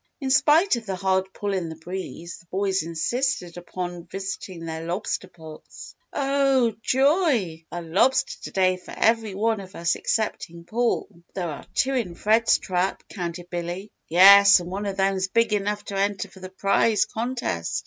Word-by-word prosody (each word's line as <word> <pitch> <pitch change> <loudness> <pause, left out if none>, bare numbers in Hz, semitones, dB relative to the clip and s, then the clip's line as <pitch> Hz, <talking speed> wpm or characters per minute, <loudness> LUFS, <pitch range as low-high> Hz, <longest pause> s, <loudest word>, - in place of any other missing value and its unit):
In 270 -2 -2
spite 300 +3 +4
of 225 -2 -8
the 190 - -2
hard 190 0 0
pull 205 0 -3
in 180 -4 -2
the 160 - -7
breeze, 170 0 -7
the 170 - -21
boys 190 +1 0
insisted 175 - -2
upon 175 -1 -6
visiting 190 -3 -6
their 160 0 -5
lobster 180 +2 -3
pots. 160 -3 -12 0.2
"Oh 275 -4 +2
joy! 260 - +1
a 175 0 -5
lobster 190 +11 +1
to - - -5
day 185 -1 +2
for 180 - -11
every 225 -3 +2
one 220 +1 +1
of 195 0 -11
us 170 0 0
excepting 170 -6 -2
Paul. 235 +6 0
But 170 -2 -25
there 175 -3 -2
are 145 - -8
two 270 - +2
in 220 -10 -2
Fred's 220 +5 +3
trap," 185 +1 -2
counted 175 -2 -6
Billy. 175 +4 -5 0.2
"Yes, 200 +3 +8
and 175 0 -7
one 200 +2 -3
of 195 -1 -4
them's 195 -1 +1
big 230 +2 +2
enough 205 0 -1
to 200 - -6
enter 200 0 -1
for 190 - -15
the 185 0 -8
prise 200 +3 +2
contest. 230 - -3
195 Hz, 175 wpm, -24 LUFS, 175-225 Hz, 0.2 s, Yes